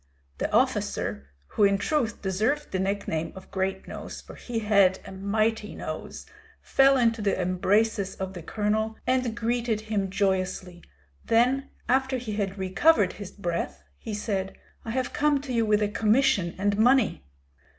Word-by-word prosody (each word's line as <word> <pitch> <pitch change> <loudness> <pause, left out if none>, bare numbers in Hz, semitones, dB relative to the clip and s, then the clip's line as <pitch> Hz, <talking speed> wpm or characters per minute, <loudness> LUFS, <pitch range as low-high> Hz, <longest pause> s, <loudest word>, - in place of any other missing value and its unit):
The - - -1
officer 70 0 0 0.2
who - - +1
in 200 0 +5
truth 225 0 -1
deserved 220 +11 0
the 185 - -1
nickname 190 -4 -2
of 190 - -12
Great 190 0 -2
nose, - - -7
for - - -12
he 240 -2 -6
had 200 -4 +4
a - - -9
mighty 210 +3 -1
nose - - -6 0.3
fell 270 0 +4
into 230 -2 +2
the 200 -2 0
embraces 195 +3 +1
of 190 0 -5
the 175 - -7
colonel, 215 +4 -1
and 255 -2 0
greeted 230 -1 0
him 210 -3 -2
joyously; 185 -2 -1 0.4
then 250 +4 +2 0.2
after 265 +1 +2
he 235 -4 -5
had 200 -1 -2
recovered 190 - +3
his 205 -3 -8
breath, 175 -4 -4 0.2
he 220 -2 -5
said, 195 -2 -3 0.3
"I - - -7
have 255 +2 -2
come 295 -1 +2
to 270 -3 -5
you 230 -2 +1
with 210 0 +3
a - - +2
commission 210 -4 +2
and 200 +2 0
money." 245 - +3
210 Hz, 160 wpm, -26 LUFS, 190-235 Hz, 0.4 s, in